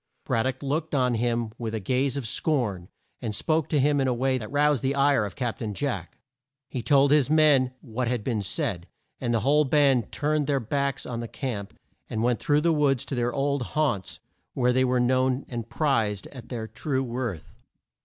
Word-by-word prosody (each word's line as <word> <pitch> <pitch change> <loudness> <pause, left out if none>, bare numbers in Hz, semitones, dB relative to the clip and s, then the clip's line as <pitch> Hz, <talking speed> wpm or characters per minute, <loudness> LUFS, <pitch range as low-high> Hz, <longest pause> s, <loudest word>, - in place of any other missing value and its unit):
Brad 115 - +1
dock 130 - -4
looked 155 +3 -1
on 125 -2 +2
him 115 -1 0
with 115 -2 -3
a - - -2
gaze 130 +7 0
of 130 -5 -3
scorn, 110 - -1 0.3
and 105 -2 -3
spoke 155 +5 0
to 150 - +2
him 145 +1 +3
in 135 - +1
a 125 - +1
way 130 +1 +1
that 110 - -7
roused 145 -2 +3
the 135 +1 0
ire 140 -5 +3
of 100 - -7
Cap 120 -4 -3
tain 105 -3 -4
Jack. 120 -11 -3 0.5
He 130 - -4
told 140 +3 +4
his 145 -2 +4
men 145 -5 +4
what 125 0 -3
had 120 -3 -1
been 115 -4 -1
said, 100 - -2 0.3
and 120 -2 -1
the 115 -2 +1
whole 150 +5 +4
band 135 -5 +3
turned 150 -1 0
their 140 -2 +2
backs 140 +3 -2
on 120 -2 -4
the 120 - -4
camp, 110 -7 -5 0.3
and 110 - -2
went 120 -1 +1
through 145 0 +2
the 165 +1 +3
woods 140 -5 +2
to - - -6
their 120 -1 0
old 140 +1 0
haunts 120 -7 -1 0.4
where 125 -1 +2
they 130 +1 +3
were 125 -1 +2
known 130 +2 +1
and 115 -2 -6
prized 115 -9 0
at 125 -4 -11
their 115 -3 -4
true 135 +2 -2
worth. 120 -8 -4
130 Hz, 205 wpm, -26 LUFS, 115-140 Hz, 0.5 s, told